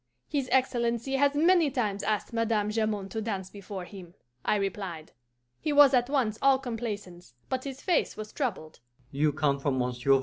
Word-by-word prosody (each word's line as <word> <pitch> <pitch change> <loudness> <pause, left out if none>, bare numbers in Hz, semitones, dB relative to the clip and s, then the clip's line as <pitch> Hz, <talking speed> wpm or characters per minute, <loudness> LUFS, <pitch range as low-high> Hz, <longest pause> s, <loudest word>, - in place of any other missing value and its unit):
'His 275 -3 -2
Excellency 245 0 +1
has 285 +1 +3
many 335 0 +4
times 215 -7 -1
asked 215 +2 -1
Madame 225 -2 +1
Jamond 215 -3 -1
to 220 - -3
dance 195 -4 -4
before 195 -2 -7
him,' 180 -3 -12 0.3
I - - +2
replied. 190 -5 -4 0.5
He 305 - -1
was 285 -2 +7
at 245 0 +3
once 245 -7 0
all 275 -1 +5
complaisance, 205 - -6
but 260 0 -2
his 270 -1 -6
face 355 -4 +1
was 215 0 -7
troubled. 190 - -3
225 Hz, 145 wpm, -28 LUFS, 200-265 Hz, 0.5 s, was